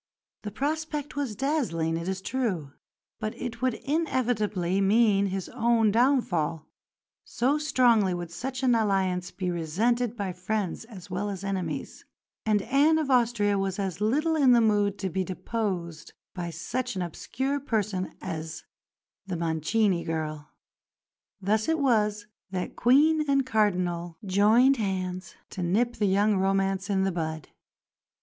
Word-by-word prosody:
The 210 - -5
prospect 300 +5 -3
was 275 -7 -2
dazzling, 220 - 0
it 170 +1 -4
is 190 0 -3
true, 195 - -2 0.5
but 215 -1 -4
it 235 -1 -5
would 255 -3 +1
inevitably 220 - 0
mean 200 0 +4
his 190 -1 -3
own 235 -3 +2
downfall, 195 - +1 0.6
so 270 +5 0
strongly 245 -9 +3
would 175 -1 -6
such 260 +7 -5
an 250 -2 +4
alliance 190 -5 +1
be 180 -2 -3
resented 220 +9 0
by 195 -3 -3
friends 190 +2 -3
as 195 -5 -12
well 200 +3 -2
as 195 -1 -5
enemies; 195 -2 -4 0.4
and 210 -2 +2
Anne 285 +7 +3
of 300 -4 -1
Austria 230 -5 +2
was 195 -1 -2
as 195 -2 -3
little 300 +10 +2
in 270 -5 +5
the 240 - +6
mood 205 -3 +2
to 190 - -3
be 190 +2 0
deposed 185 -4 -4 0.2
by 175 -2 -4
such 250 +9 -3
an 185 - -1
obscure 265 - -3
person 210 -8 -2
as 160 -3 -5 0.6
the 180 -3 -3
"Mancini 170 +4 +1
girl." 155 -2 -4 0.9
Thus 215 +6 0
it 320 - +2
was 215 -7 +1 0.2
that 185 -1 -4
Queen 305 +6 +4
and 275 -1 +3
Cardinal 180 -7 0
joined 220 +8 +4
hands 185 -4 -3 0.2
to 185 - -5
nip 230 +8 +1
the 205 - +1
young 200 +2 +3
romance 195 +1 0
in 190 -1 +2
the 195 - +1
bud. 160 -2 -4
205 Hz, 145 wpm, -27 LUFS, 185-245 Hz, 0.9 s, the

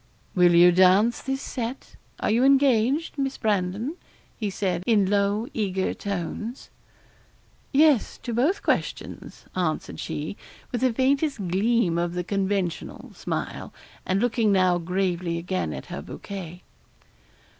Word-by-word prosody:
'Will 175 -1 +5
you 175 +1 +8
dance 190 +6 +4
this 270 0 -3
set 245 +1 -5 0.2
are - - 0
you 235 +3 +3
engaged, 275 +2 +3
Miss 270 -1 -1
Brandon?' 210 - -1 0.4
he 215 -3 -3
said, 185 -3 -1
in 215 -4 +4
low 205 +3 +1
eager 190 -4 -1
tones. 205 +5 -5 1.0
'Yes, 290 -4 +4
to 240 - -3
both 290 - +1
questions,' - - -3
answered 175 -4 -2
she, 155 +8 -4 0.3
with 240 - -2
the 255 -1 +3
faintest 275 +4 +1
gleam 195 -2 +2
of 175 0 -2
the 180 - -1
conventional 195 -2 -2
smile, - - -4 0.3
and 190 +1 0
looking 225 -2 +2
now 185 -2 +3
gravely 180 -1 -1
again 175 - -2
at - - -6
her - - -4
bouquet. 180 -3 -8
200 Hz, 130 wpm, -25 LUFS, 180-240 Hz, 1.0 s, you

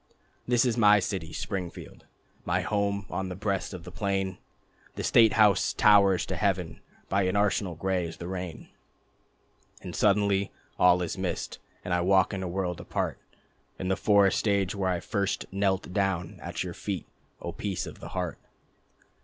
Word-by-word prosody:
This 120 0 +3
is 120 -1 +1
my 105 -1 +7
city 90 -5 -3
Springfield, 90 -1 -6 0.4
My - - 0
home 100 -1 -1
on 95 +1 -2
the 90 - -5
breast 100 0 -2
of 90 -3 -8
the 90 - -9
plain. 95 -2 -2 0.6
The - - -4
state 115 -2 +5
house 105 -3 +4
towers 100 -3 +5
to 95 - -3
heaven, 90 -3 -1 0.3
By 100 +1 +1
an 95 - 0
arsenal 100 -3 +1
gray 90 +1 -1
as 80 - -9
the 85 - -7
rain... 90 -2 -6 1.1
And - - -6
suddenly 100 -1 +2 0.3
all 90 0 +5
is 90 - -4
mist, 95 -2 -3 0.3
And 90 - -1
I 90 - +2
walk 95 +2 +3
in 95 - -3
a 95 - -3
world 90 -1 -2
apart, - - -3 0.6
In 95 - -3
the 95 - +2
forest 100 +1 +3
age 100 -2 +2
when 95 -2 0
I 85 -2 -1
first 100 -1 -1
knelt 95 -2 0
down 95 -3 -1
At - - -4
your 90 -2 -5
feet, 95 -3 -4 0.3
O - - -5
Peace 100 -3 -3
of - - -10
the - - -8
Heart. - - -3
95 Hz, 170 wpm, -28 LUFS, 90-100 Hz, 1.1 s, my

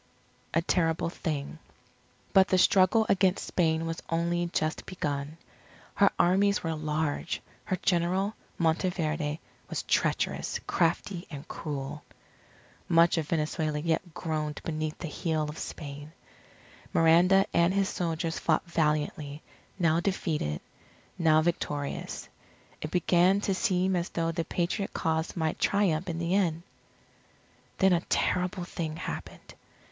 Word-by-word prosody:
A 165 - +3
TERRIBLE 165 -2 +1
THING 150 -2 -4 0.7
But 190 -1 +6
the 185 - +3
struggle 190 +4 +5
against 190 -1 +2
Spain 160 -2 +1
was 165 0 -4
only 170 +1 0
just 155 -2 -2
begun. 145 -4 -3 0.6
Her 200 -1 +5
armies 200 +3 +3
were 165 -1 -1
large. 155 +1 -2 0.3
Her 185 - 0
General, 185 +3 +1 0.2
Monteverde, 160 -2 0 0.3
was - - -3
treacherous, - - 0
crafty, 175 +2 0
and 145 -3 -8
cruel. 145 -1 -5 0.9
Much 170 0 +5
of 155 - -3
Venezuela 155 -1 -1
yet 165 +2 -1
groaned 155 -3 -2
beneath 155 -1 -3
the 170 - -5
heel 155 +1 -1
of 150 +1 -5
Spain. 145 +1 -7 0.8
Miranda 175 +4 +5
and 170 +1 +4
his 195 0 +2
soldiers 165 -2 -2
fought 160 +2 +1
valiantly, 150 -3 -1 0.3
now 170 -3 +3
defeated, 160 - -1 0.6
now 155 -2 +5
victorious. 145 -4 -3 0.5
It 155 - -3
began 180 +2 +3
to 200 - 0
seem 185 -2 +1
as 175 0 -1
though 165 0 -1
the 165 0 -2
Patriot 185 +3 -2
cause 160 +1 -1
might 160 -2 -1
triumph 190 -3 +1
in 165 - -3
the 170 +1 -1
end. 170 -4 +1 1.1
Then 190 -1 +5
a 170 - +2
terrible 180 0 +1
thing 165 -3 -4
happened. 170 - -7
165 Hz, 125 wpm, -29 LUFS, 155-180 Hz, 1.1 s, But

